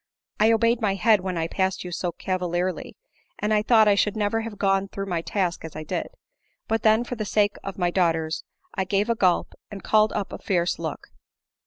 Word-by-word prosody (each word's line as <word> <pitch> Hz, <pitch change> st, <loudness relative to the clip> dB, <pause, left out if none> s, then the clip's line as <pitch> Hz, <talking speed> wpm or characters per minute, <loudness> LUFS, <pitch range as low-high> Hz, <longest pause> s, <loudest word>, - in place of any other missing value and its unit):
I 215 Hz, +2 st, +5 dB
obeyed 230 Hz, +1 st, +2 dB
my 200 Hz, -3 st, +1 dB
head 210 Hz, +1 st, +4 dB
when 185 Hz, -2 st, -3 dB
I 165 Hz, 0 st, -1 dB
passed 190 Hz, +2 st, -1 dB
you 180 Hz, -, -7 dB
so 175 Hz, 0 st, -2 dB
cavalierly, 180 Hz, 0 st, -3 dB, 0.4 s
and 210 Hz, +1 st, 0 dB
I 210 Hz, -, +3 dB
thought 220 Hz, -1 st, +5 dB
I 205 Hz, -, +6 dB
should 210 Hz, +1 st, +1 dB
never 215 Hz, +2 st, 0 dB
have 225 Hz, -2 st, -7 dB
gone, 195 Hz, 0 st, +1 dB
through 195 Hz, 0 st, -5 dB
my 175 Hz, -4 st, -2 dB
task 180 Hz, 0 st, -2 dB
as 160 Hz, -, -8 dB
I 155 Hz, -, -5 dB
did; 155 Hz, -, -3 dB, 0.6 s
but 225 Hz, 0 st, 0 dB
then 220 Hz, +2 st, +4 dB
for 245 Hz, -, -6 dB
the 225 Hz, -3 st, -3 dB
sake 205 Hz, 0 st, +1 dB
of 195 Hz, -, -6 dB
my 175 Hz, -2 st, +1 dB
daughters, 165 Hz, -3 st, 0 dB, 0.3 s
I 190 Hz, -, -1 dB
gave 200 Hz, +4 st, 0 dB
a -, -, +1 dB
gulp, 185 Hz, -5 st, +1 dB, 0.2 s
and 200 Hz, -2 st, -9 dB
called 215 Hz, -1 st, +3 dB
up 205 Hz, -2 st, -3 dB
a -, -, -6 dB
fierce 175 Hz, -2 st, 0 dB
look. -, -, -5 dB
195 Hz, 215 wpm, -24 LUFS, 180-215 Hz, 0.6 s, I